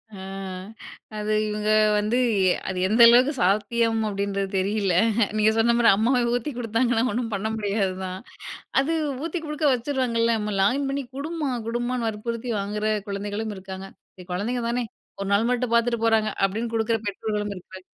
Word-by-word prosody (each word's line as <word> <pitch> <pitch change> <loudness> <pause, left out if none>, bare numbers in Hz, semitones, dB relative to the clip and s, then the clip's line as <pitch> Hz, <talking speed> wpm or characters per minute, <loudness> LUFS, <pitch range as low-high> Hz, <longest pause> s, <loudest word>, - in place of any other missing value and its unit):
ஆ. - - -9 1.0
அது 210 0 -2 0.2
இவங்க 210 0 -2 0.3
வந்து, 210 +3 +1 0.5
அது 190 - -3
எந்த 220 +4 +3
அளவுக்கு 250 +4 +6
சாத்தியம் 225 +4 +2
அப்பிடீன்றது 200 -1 -2
தெரியல 200 0 0 0.4
நீங்க 215 0 +4
சொன்ன 230 +1 +4
மாதிரி 235 -1 +5
அம்மாவே 245 +5 +2
ஊத்தி 245 +5 -2
குடுத்தாங்கன்னா 230 0 +1
ஒண்ணும் 230 0 -2
பண்ண 200 +2 -2
முடியாது 200 -3 -1
தான். 185 0 -5 0.6
அது 305 +5 -1 0.3
ஊத்தி 335 +1 -3
குடுக்க 300 0 -2
வச்சுருவாங்கல்ல. 235 -3 0
"அம்மா 210 0 -3
லாகின் 265 +8 +2
பண்ணி 280 0 -2
குடும்மா" 310 0 -3 0.2
குடும்மான்னு 240 0 -1
வற்புறுத்தி 230 +3 -4
வாங்கிற 210 +2 -3 0.2
குழந்தைகளும் 205 +2 -3
இருக்காங்க. 190 0 -8 0.3
சரி, 180 -1 -13
குழந்தைங்க 235 +6 -2
தானே 245 +1 0 0.4
1 195 - -3
நாள் 220 +4 +3
மட்டும் 250 -1 0
பார்த்துட்டு 235 -1 +2
போறாங்க. 220 -1 +3
அப்பிடின்னு 225 +4 -1
குடுக்குற 225 0 +1
பெற்றோர்களும் 210 0 -3
இருக்காங்க. 185 0 -12
225 Hz, 150 wpm, -24 LUFS, 205-240 Hz, 1.0 s, அளவுக்கு